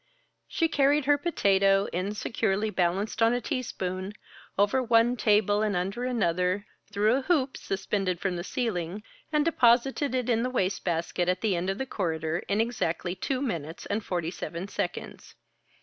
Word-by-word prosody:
She 330 Hz, -, +1 dB
carried 285 Hz, -1 st, +2 dB
her 290 Hz, 0 st, +4 dB
potato, 195 Hz, -, +3 dB
insecurely 205 Hz, +2 st, -1 dB
balanced 190 Hz, +4 st, 0 dB
on 225 Hz, +1 st, +5 dB
a -, -, 0 dB
teaspoon, 195 Hz, -, -3 dB, 0.4 s
over 205 Hz, +7 st, +3 dB
one 235 Hz, 0 st, +3 dB
table 210 Hz, -2 st, +3 dB
and 210 Hz, -2 st, 0 dB
under 195 Hz, +7 st, -2 dB
another, 185 Hz, -4 st, 0 dB, 0.3 s
through 210 Hz, +2 st, +3 dB
a -, -, -1 dB
hoop 275 Hz, -3 st, +1 dB
suspended 195 Hz, -2 st, -2 dB
from 190 Hz, -1 st, -1 dB
the 175 Hz, -, -4 dB
ceiling, 200 Hz, -3 st, -3 dB, 0.3 s
and 300 Hz, -1 st, +2 dB
deposited 260 Hz, -1 st, +3 dB
it 250 Hz, -2 st, -1 dB
in 230 Hz, -2 st, +2 dB
the 250 Hz, -, 0 dB
wastebasket 180 Hz, -5 st, -1 dB
at 180 Hz, 0 st, 0 dB
the 210 Hz, -4 st, +1 dB
end 175 Hz, +2 st, -1 dB
of 195 Hz, -, -1 dB
the 265 Hz, -, -2 dB
corridor, 165 Hz, -7 st, -2 dB
in 200 Hz, +1 st, +1 dB
exactly 190 Hz, -7 st, -1 dB
two 255 Hz, +8 st, -2 dB
minutes 165 Hz, -, -4 dB
and 210 Hz, +1 st, -2 dB
forty 175 Hz, -3 st, -2 dB
seven 180 Hz, 0 st, -5 dB
seconds. -, -, -5 dB
205 Hz, 160 wpm, -28 LUFS, 185-245 Hz, 0.4 s, on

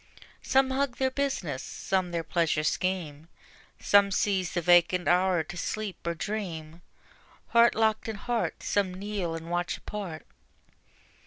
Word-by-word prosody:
Some 265 Hz, 0 st, +2 dB
hug 270 Hz, -1 st, 0 dB
their 260 Hz, 0 st, +1 dB
business, 255 Hz, -, -2 dB
some 190 Hz, -2 st, -2 dB
their 170 Hz, -1 st, -2 dB
pleasure 165 Hz, -2 st, 0 dB
scheme; 160 Hz, -3 st, -2 dB, 0.5 s
Some 200 Hz, 0 st, +5 dB
seize 190 Hz, -2 st, 0 dB
the 175 Hz, -, +1 dB
vacant 175 Hz, +1 st, +4 dB
hour 180 Hz, -1 st, +3 dB
to 165 Hz, -, -9 dB
sleep 210 Hz, +3 st, -3 dB
or 170 Hz, -, -1 dB
dream; 170 Hz, -5 st, -5 dB, 0.7 s
Heart 235 Hz, 0 st, +5 dB
locked 220 Hz, 0 st, +1 dB
in 220 Hz, -, -3 dB
heart 235 Hz, +3 st, -2 dB
some 190 Hz, -3 st, 0 dB
kneel 195 Hz, -4 st, -3 dB
and 165 Hz, +1 st, -7 dB
watch 175 Hz, 0 st, -1 dB
apart. 190 Hz, -7 st, -7 dB
185 Hz, 140 wpm, -28 LUFS, 170-215 Hz, 0.7 s, Some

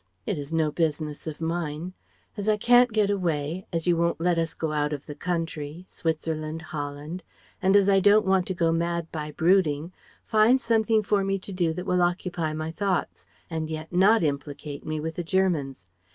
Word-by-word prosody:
It -, -, -2 dB
is 145 Hz, +1 st, -7 dB
no 160 Hz, -2 st, +1 dB
business 155 Hz, -1 st, -2 dB
of 155 Hz, -1 st, -5 dB
mine. 165 Hz, +1 st, -3 dB, 0.4 s
As 205 Hz, 0 st, -2 dB
I 215 Hz, -, +3 dB
can't 245 Hz, +2 st, +5 dB
get 210 Hz, -2 st, +2 dB
away, 170 Hz, -2 st, -2 dB
as 165 Hz, -2 st, -2 dB
you 175 Hz, -1 st, +3 dB
won't 170 Hz, 0 st, 0 dB
let 170 Hz, 0 st, +2 dB
us 165 Hz, 0 st, -2 dB
go 160 Hz, -1 st, -2 dB
out 150 Hz, 0 st, 0 dB
of 145 Hz, -1 st, -6 dB
the 150 Hz, -, -7 dB
country 165 Hz, 0 st, -4 dB
Switzerland, 160 Hz, -1 st, -3 dB
Holland 150 Hz, +2 st, -5 dB, 0.4 s
and 190 Hz, +1 st, +3 dB
as 200 Hz, -1 st, +5 dB
I 195 Hz, -1 st, +5 dB
don't 205 Hz, +2 st, +5 dB
want 190 Hz, -1 st, +2 dB
to 185 Hz, -, -2 dB
go 165 Hz, -1 st, +2 dB
mad 170 Hz, 0 st, -1 dB
by 150 Hz, -2 st, -4 dB
brooding, 165 Hz, -1 st, +2 dB, 0.3 s
find 220 Hz, +4 st, +4 dB
something 225 Hz, -2 st, +2 dB
for 200 Hz, -1 st, +1 dB
me 195 Hz, 0 st, 0 dB
to 195 Hz, +1 st, -8 dB
do 175 Hz, -3 st, +1 dB
that 180 Hz, +2 st, -5 dB
will 180 Hz, -1 st, +2 dB
occupy 175 Hz, -2 st, 0 dB
my 155 Hz, +1 st, -4 dB
thoughts: 190 Hz, +1 st, -2 dB, 0.2 s
and 160 Hz, -2 st, -3 dB
yet 155 Hz, +1 st, -6 dB
not 195 Hz, +3 st, +5 dB
implicate 145 Hz, 0 st, -3 dB
me 155 Hz, 0 st, -3 dB
with 160 Hz, +1 st, -3 dB
the 175 Hz, -, -4 dB
Germans. 160 Hz, -, 0 dB
165 Hz, 195 wpm, -26 LUFS, 155-190 Hz, 0.4 s, can't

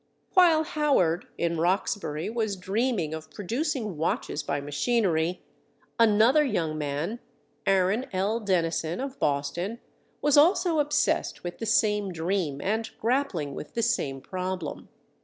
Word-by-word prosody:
While 335 Hz, -4 st, +6 dB
Howard 285 Hz, -, +1 dB
in 170 Hz, -1 st, 0 dB
Roxbury 175 Hz, -3 st, 0 dB
was 220 Hz, -2 st, -1 dB
dreaming 195 Hz, -3 st, -1 dB
of 155 Hz, 0 st, -7 dB
producing 225 Hz, -, -3 dB
watches 155 Hz, -1 st, -1 dB
by 140 Hz, 0 st, -2 dB
machinery, 165 Hz, -, 0 dB, 0.6 s
another 230 Hz, +6 st, +5 dB
young 170 Hz, -, -1 dB
man—Aaron 185 Hz, -, -2 dB
L. 200 Hz, +5 st, 0 dB
Dennison, 170 Hz, -5 st, 0 dB
of 270 Hz, 0 st, -5 dB
Boston—was 175 Hz, -, -2 dB
also 335 Hz, +1 st, +4 dB
obsessed 295 Hz, 0 st, 0 dB
with 175 Hz, 0 st, -6 dB
the 225 Hz, -, -3 dB
same 210 Hz, -2 st, +2 dB
dream 165 Hz, -4 st, -1 dB
and 220 Hz, +3 st, -1 dB
grappling 225 Hz, -, 0 dB
with 150 Hz, -, -8 dB
the 230 Hz, -, 0 dB
same 135 Hz, -, 0 dB
problem. 185 Hz, -2 st, -5 dB
195 Hz, 120 wpm, -27 LUFS, 165-235 Hz, 0.6 s, While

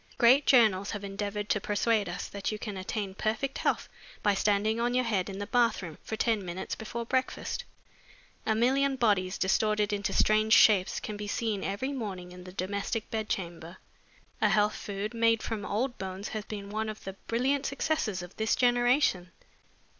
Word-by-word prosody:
Great 255 Hz, +4 st, +5 dB
journals 215 Hz, -6 st, +5 dB
have 205 Hz, -2 st, -4 dB
endeavored 205 Hz, +1 st, -3 dB
to 210 Hz, -, +1 dB
persuade 210 Hz, -1 st, +1 dB
us 175 Hz, -, -4 dB
that 200 Hz, +1 st, -3 dB
you 215 Hz, -, -3 dB
can 210 Hz, -1 st, -5 dB
attain 195 Hz, +1 st, -4 dB
perfect 220 Hz, +7 st, -2 dB
health -, -, 0 dB, 0.4 s
by 205 Hz, -, +4 dB
standing 210 Hz, +2 st, +1 dB
on 240 Hz, +1 st, +1 dB
your 255 Hz, -, +3 dB
head 205 Hz, -5 st, 0 dB
in 195 Hz, -, -6 dB
the 205 Hz, -, -3 dB
bathroom 220 Hz, -9 st, 0 dB
for 220 Hz, -, -4 dB
ten 220 Hz, -2 st, +1 dB
minutes 180 Hz, +1 st, -5 dB
before 230 Hz, +2 st, -5 dB
breakfast. 260 Hz, +2 st, -2 dB, 0.8 s
A 220 Hz, -, +1 dB
million 270 Hz, +4 st, +2 dB
bodies, 200 Hz, -6 st, +1 dB
distorted 210 Hz, +2 st, +1 dB
into 200 Hz, 0 st, -1 dB
strange 215 Hz, +1 st, +3 dB
shapes, 200 Hz, -5 st, +5 dB
can 210 Hz, -, -6 dB
be 205 Hz, 0 st, -5 dB
seen 210 Hz, -1 st, -1 dB
every 210 Hz, +8 st, -2 dB
morning 190 Hz, -8 st, -5 dB
in 180 Hz, 0 st, -11 dB
the 185 Hz, -, -9 dB
domestic 200 Hz, +4 st, -3 dB
bed 220 Hz, -2 st, -2 dB
chamber. 170 Hz, -1 st, -4 dB, 0.6 s
A 210 Hz, -, +4 dB
health 210 Hz, +2 st, +3 dB
food 205 Hz, +3 st, -5 dB
made 230 Hz, -1 st, +2 dB
from 220 Hz, -3 st, -3 dB
old 240 Hz, +6 st, -1 dB
bones 190 Hz, +1 st, -5 dB
has 215 Hz, -1 st, -4 dB
been 200 Hz, -2 st, -7 dB
one 220 Hz, +1 st, -2 dB
of 215 Hz, -, -8 dB
the 195 Hz, -, -6 dB
brilliant 265 Hz, +4 st, +1 dB
successes 275 Hz, -, -1 dB
of 180 Hz, +1 st, -11 dB
this 220 Hz, 0 st, +1 dB
generation. 245 Hz, -6 st, +2 dB
210 Hz, 180 wpm, -29 LUFS, 195-230 Hz, 0.8 s, Great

